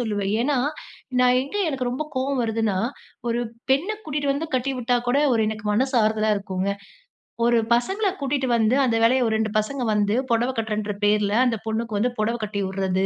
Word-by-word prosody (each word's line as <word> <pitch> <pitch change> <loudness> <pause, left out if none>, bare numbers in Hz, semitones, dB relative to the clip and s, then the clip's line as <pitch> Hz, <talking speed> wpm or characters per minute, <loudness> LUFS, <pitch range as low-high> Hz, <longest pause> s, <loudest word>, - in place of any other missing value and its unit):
சொல்லுவேன். 205 -4 -1
ஏன்னா, 280 +1 +1 0.6
நான் 250 0 +5
எங்கே 280 +10 -3
எனக்கு 260 -4 -2
ரொம்ப 255 +5 -2
கோவம் 265 0 0
வருதுன்னா, 225 -3 0 0.5
ஒரு 235 0 0 0.3
பெண்ண 280 +10 +2
கூட்டிட்டு 290 -5 -2
வந்து 290 +4 -3
கட்டிவிட்டா 250 -1 0
கூட 255 +3 +2
ஒரு 230 - +2
எனக்கு 220 0 -4
மனசு 260 +5 +1
ஆறுதலா 215 0 +1
இருக்குங்க. 195 0 -2 0.8
ஒரு 240 0 +4 0.2
பசங்கள 385 - +1
கூட்டிட்டு 270 -1 0
வந்து 225 +2 +3
அந்த 235 -3 +1
வேலைய 255 +3 +4
ஒரு 220 - 0
2 220 -1 0
பசங்க 255 +5 -3
வந்து 205 0 +1 0.2
புடவ 235 +2 +2
கட்றேன்ற 215 -2 -2
பேர்ல 205 0 +2
அந்த 235 -3 +1
பொண்ணுக்கு 220 -1 -2
வந்து 240 +4 +1
புடவ 220 +2 +1
கட்டி 205 -1 -3
விட்றது. 190 0 -1
230 Hz, 175 wpm, -23 LUFS, 215-260 Hz, 0.8 s, நான்